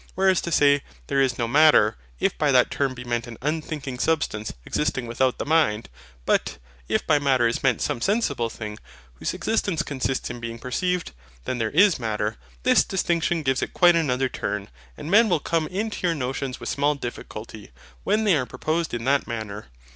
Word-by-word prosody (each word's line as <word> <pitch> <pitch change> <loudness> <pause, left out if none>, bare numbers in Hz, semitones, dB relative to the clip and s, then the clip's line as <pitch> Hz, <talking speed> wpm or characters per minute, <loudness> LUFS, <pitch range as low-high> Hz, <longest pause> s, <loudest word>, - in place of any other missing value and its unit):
Whereas 190 -1 +3
to 170 - -4
say 145 -2 +4 0.2
There 140 -1 +1
is 130 -2 +1
no 115 - -1
MATTER, 145 -4 +5 0.2
if - - +1
by - - +1
that - - +4
term 135 -2 -1
be 125 - -8
meant 120 -1 -2
an 115 -2 -9
unthinking 150 -3 -3
substance 135 -10 0
existing 125 -4 -1
without 125 +2 0
the - - -4
mind; 145 -9 +2 0.4
but - - +1 0.3
if - - 0
by 145 - +3
MATTER 135 -4 +2
is 115 - -2
meant 130 -3 +1
some 140 -6 -2
sensible 145 - 0
thing, 105 -2 -7 0.4
whose - - -2
existence 200 -7 0
consists 135 -2 -2
in 120 - -7
being 115 0 -6
perceived, 180 - -2 0.3
then 125 - -2
there 110 -1 0
is 185 - +4
MATTER: 105 - -2 0.3
THIS - - +5
distinction 170 -3 0
gives 130 -1 +1
it - - -4
quite 175 -1 +6
another 135 -5 +1
turn; 105 -4 -4 0.3
and 155 - -6
men 220 +2 +6
will 175 - +2
come 160 +1 -1
into 205 -1 -2
your 170 - +1
notions 130 -1 -3
with - - -7
small 145 +1 +1
difficulty, 110 -4 -8 0.3
when 215 +2 +1
they 200 -5 +4
are 130 -4 -1
proposed 160 -2 -2
in 115 - -4
that 140 +3 +1
manner. 110 -3 -5
135 Hz, 190 wpm, -24 LUFS, 120-165 Hz, 0.4 s, quite